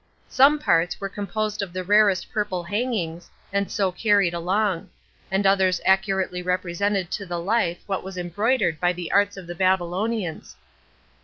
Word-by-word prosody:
Some 280 +3 +5
parts 175 - +1
were 195 - -4
composed 210 +1 -3
of 190 -3 -5
the 185 0 -3
rarest 205 0 +3
purple 205 -4 -2
hangings, 185 -5 -3 0.2
and 200 0 0
so 195 -2 0
carried 200 -2 +2
along; 185 +1 -1 0.4
and 195 +1 0
others 190 -2 +3
accurately 190 -1 +1
represented 185 +1 -1
to 200 - -3
the 175 -1 -3
life 180 -2 0
what 195 -2 -3
was 190 0 -8
embroidered 180 0 0
by 180 0 +2
the 180 -1 -6
arts 205 0 +2
of 190 - -8
the 175 - -6
Babylonians. 185 +1 -1
190 Hz, 155 wpm, -24 LUFS, 175-205 Hz, 0.4 s, Some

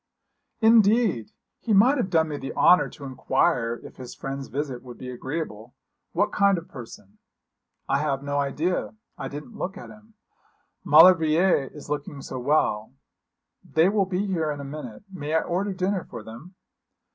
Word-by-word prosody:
'Indeed! 220 - +4 0.3
He 225 - -1
might 245 +9 +5
have 220 -7 -1
done 160 -3 +2
me 145 - -4
the 135 - -6
honour 180 - +5
to 145 - -13
inquire 130 -2 0
if - - -12
his 125 -2 -9
friend's 135 0 -5
visit 135 -3 -4
would 125 -2 -11
be 125 -1 -7
agreeable. 125 -3 -6 0.4
What - - +1
kind 200 -1 +3
of 165 - -7
person?' 115 -6 -12 0.7
'I 140 - +1
have 140 -2 -1
no 145 0 -1
idea. 155 +9 -1 0.2
I - - -4
didn't 150 +11 -9
look 195 +3 -4
at - - -10
him. 215 +1 -18 0.7
Maulevrier 165 -1 +5
is 150 - -12
looking 145 -1 -4
so 130 - -6
well. 125 -5 0 0.7
They 160 +4 +3
will 200 -1 +2
be 190 +1 -1
here 170 -6 -1
in 145 -1 -4
a - - -6
minute. 140 - -8
May 155 -3 -3
I 160 - +4
order 190 +4 -2
dinner 185 0 -1
for 110 - -9
them?' 120 - -12
155 Hz, 170 wpm, -25 LUFS, 135-185 Hz, 0.7 s, might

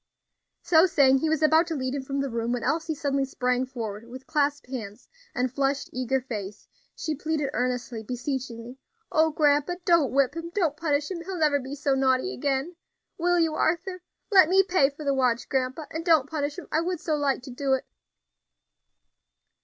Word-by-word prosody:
So 330 +1 +5
saying, 270 -5 +4
he 315 - 0
was 315 0 +1
about 315 +2 +5
to 325 - -3
lead 260 -2 -2
him 280 - -2
from 275 +1 -3
the 275 - -2
room, 230 0 -2
when 245 -1 -2
Elsie 315 +3 -1
suddenly 280 -2 0
sprang 250 -1 -1
forward, 220 -5 -5
and 235 +1 -16
with 260 +1 -9
clasped 290 -2 0
hands, 220 -6 -7 0.3
and 250 -1 -1
flushed, 275 +1 -1
eager 255 +1 0
face, 210 -6 -7 0.3
she 315 - -3
pleaded 300 -1 -2
earnestly, 245 -2 -2
beseechingly, 250 0 -5 0.3
"O 320 0 +4
grandpa! 295 +2 +2
don't 335 -7 +4
whip 275 +1 +2
him, 335 0 -5
don't 335 -8 +1
punish 300 -1 -1
him! 360 - -4
He 335 - -10
will 380 -1 -4
never 300 -3 +3
be 265 +1 -6
so 280 -1 0
naughty 265 +6 +1
again. 280 +5 -2 0.4
Will 355 +1 +2
you, 325 -2 +2
Arthur? 350 +4 -1 0.3
Let 375 -5 +7
me 385 +1 +5
pay 360 -7 +3
for 290 +2 -10
the 280 -1 +1
watch, 250 -3 +1
grandpa, 265 +3 -1
and 320 +1 -4
don't 325 -6 +4
punish 290 -1 -3
him. 360 - -7
I 315 - +2
would 355 0 -2
so 310 -1 -1
like 280 -3 0
to 260 - -9
do 270 +2 0
it." 265 - 0
280 Hz, 195 wpm, -26 LUFS, 255-320 Hz, 0.4 s, Let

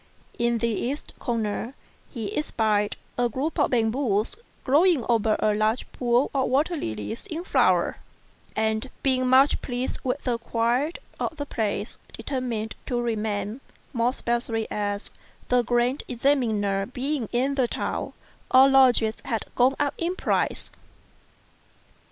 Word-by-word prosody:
In 235 0 +2
the 235 - 0
east 250 +6 -3
corner 230 +1 -2 0.3
he 220 -6 -5
espied 215 -8 +1 0.2
a 245 -1 +3
group 275 +8 -2
of - - +3
bamboos, 225 - +1 0.3
growing 295 -1 +4
over 225 -2 +3
a 215 - +2
large 215 +3 +1
pool 245 +2 +1
of 270 -2 +1
water 295 +7 +2
lilies 110 - -5
in 335 -2 -4
flower; - - +2 0.6
and, 220 +3 0
being 255 -2 +2
much 265 +3 +5
pleased 245 0 -3
with 260 +2 -1
the 240 -2 0
quiet 240 +7 0 0.2
of 320 - -2
the 285 - -3
place, 215 -5 -3
determined 235 -5 -3
to 245 -2 0
remain; 220 0 -2 0.3
more 235 -1 +2
especially 235 -3 -1
as, 205 0 -2 0.4
the 250 0 +4
Grand 245 +3 +1
Examiner 220 -7 +1
being 260 -1 -2
in 260 +3 +1
the 260 -3 +2
town, - - -3 0.4
all 265 +1 +7
lodgings 245 -5 +4
had 230 -4 -2
gone 255 +2 +3
up 285 -1 +1
in 345 +2 -1
price. - - -1
240 Hz, 135 wpm, -25 LUFS, 220-270 Hz, 0.6 s, all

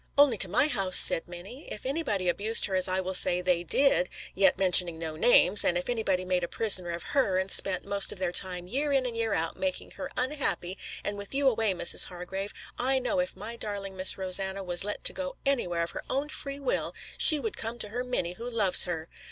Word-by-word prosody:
"Only 280 -7 +3
to 190 - +5
my 240 +10 +2
house," 195 -10 +1
said 165 - +7
Minnie. 185 - -11
"If 210 - -8
anybody 255 - -3
abused 210 +6 +2
her 195 - -4
as 185 0 +4
I 185 0 -1
will 190 0 -5
say 180 -1 +5
they 180 -1 -1
did, 180 - +1 0.2
yet 195 0 +2
mentioning 180 -3 +5
no 160 -1 -6
names, 200 +2 +6
and 175 - 0
if 180 - -5
anybody 195 -6 -2
made 180 -1 -2
a - - -2
prisoner 190 -5 +2
of 170 0 -6
her, 230 -10 +1
and 190 +1 -2
spent 185 -2 +2
most 200 -1 -2
of - - -8
their 185 -2 -3
time 180 -1 -1
year 280 +9 -3
in 270 -2 0
and 240 -2 -5 0.2
out 165 -3 -3
making 280 -1 -5
her - - -8
unhappy, 250 - -3 0.3
and 205 0 -5
with 200 +6 -9
you 280 0 +1
away, 225 -5 0
Mrs. 175 -1 +4
Hargrave, 190 +3 -8 0.3
I 265 +2 +1
know 260 +3 -2
if 270 0 -3
my 230 - -8
darling 200 -3 -7
Miss 185 0 +2
Rosanna 190 +1 +1
was 175 -1 -1
let 205 +1 -5
to - - +1
go 275 -1 -6
anywhere 180 -12 -1
of 170 - -6
her - - -7
own 280 +3 -3
free 280 -2 -5
will, 275 -3 -3 0.2
she 310 - +4
would 225 -5 -5
come 225 +2 -5
to 215 -3 -4
her 245 +4 -5
Minnie 245 -9 -4
who 235 +6 -8
loves 210 -6 +4
her. 165 -3 -6
195 Hz, 225 wpm, -27 LUFS, 180-250 Hz, 0.3 s, said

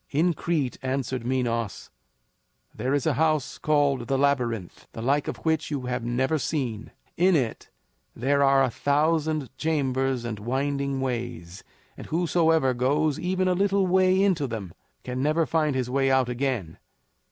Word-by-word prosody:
"In 170 +5 +2
Crete," 150 -5 -2
answered 130 -2 -2
Minos, 115 -4 -2 0.8
"there 125 +5 -2
is 145 - -1
a - - +2
house 155 -4 +1
called 145 -5 +1
the 135 - +1
Labyrinth, 125 -9 -1
the 115 - -6
like 140 +3 +1
of - - -3
which 160 -1 +1
you 145 -3 -2
have 125 -1 -3
never 130 +6 0
seen. 120 -6 -3 0.3
In 185 +1 +4
it 125 -7 -2 0.5
there 140 +4 +1
are 135 -1 +5
a 130 - +1
thousand 150 0 0
chambers 135 -5 0
and 110 -3 -4
winding 140 +3 -1
ways, 120 -9 -4 0.3
and - - -10
whosoever 160 -4 +2
goes 145 +4 +1
even 185 +1 0
a 185 - +3
little 195 +1 +2
way 185 0 +3
into 175 -8 +1
them 105 -8 -6 0.3
can 125 0 -4
never 155 +3 +2
find 155 -4 0
his 130 -2 -1
way 135 +1 +1
out 130 -2 +2
again. 125 - -2
135 Hz, 155 wpm, -26 LUFS, 125-155 Hz, 0.8 s, are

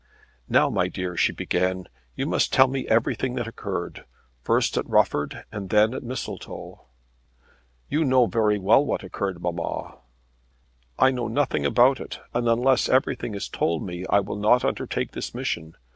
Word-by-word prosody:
"Now, - - +4
my - - +1
dear," 90 -1 -4
she - - +2
began, 90 +1 -1 0.3
"you - - -2
must - - +1
tell 130 0 +6
me 130 0 -3
everything 120 +3 +1
that 115 - -3
occurred 115 - -5 0.4
first - - +1
at - - -2
Rufford, 75 - +1
and 100 -3 -6
then 105 +3 +4
at 130 - -4
Mistletoe." 130 +2 -7 1.0
"You 155 +2 +1
know 130 -3 +4
very 105 0 +1
well 105 +8 +4
what 145 - -2
occurred, 95 -1 -4
mamma." 85 -1 -4 1.0
"I 130 - +5
know 125 -3 -2
nothing 115 - 0
about 125 - +4
it, - - -7
and 120 0 +1
unless 125 +3 +3
everything 130 -4 +1
is 100 - -4
told 80 -1 -1
me 90 -1 -6
I 100 - +4
will 100 - -5
not 110 +4 +3
undertake - - -2
this - - -6
mission. 80 -1 -4
110 Hz, 160 wpm, -24 LUFS, 95-130 Hz, 1.0 s, tell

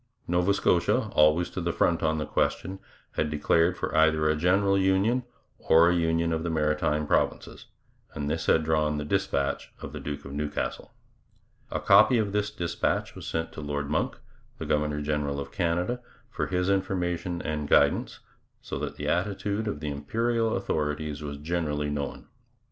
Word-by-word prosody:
Nova 90 +3 +2
Scotia, 90 -3 +2
always 75 +3 +4
to 95 - -4
the 85 0 0
front 85 0 +1
on 80 -1 +1
the 75 - -2
question, 95 +6 -1 0.3
had 75 - -1
declared 80 +4 +2
for - - -3
either 80 -1 +4
a 75 - +3
general 95 +5 +3
union 95 +6 +2 0.4
or 85 +1 +5
a - - +2
union 85 0 +1
of 80 - -1
the 85 - -2
Maritime 75 -1 0
Provinces, - - -1 0.5
and 70 - -3
this 80 +2 -2
had 80 - +4
drawn 75 -1 +1
the 75 - -3
dispatch 75 -6 -1
of - - -8
the - - -5
Duke 75 -1 -6
of 70 - -8
Newcastle. 75 +1 -3 0.8
A - - -2
copy 125 - +6
of 105 -3 0
this 105 +1 0
dispatch 85 -5 -2
was - - -9
sent 80 0 -2
to - - -8
Lord 75 -1 -3
Monck, 75 - -1 0.4
the - - -5
governor 75 0 0
general 75 -1 -1
of 70 - -6
Canada, 90 +9 -1 0.3
for - - -2
his 90 -1 0
information 90 -2 -1
and 75 -1 -3
guidance, - - +3 0.4
so - - -6
that - - -4
the - - -5
attitude 100 +3 -1
of 75 -8 -3
the 75 -1 -3
Imperial 115 +10 0
authorities 75 -4 -2
was 70 -1 -5
generally 75 -2 -2
known. 70 -1 -4
80 Hz, 170 wpm, -27 LUFS, 75-95 Hz, 0.8 s, copy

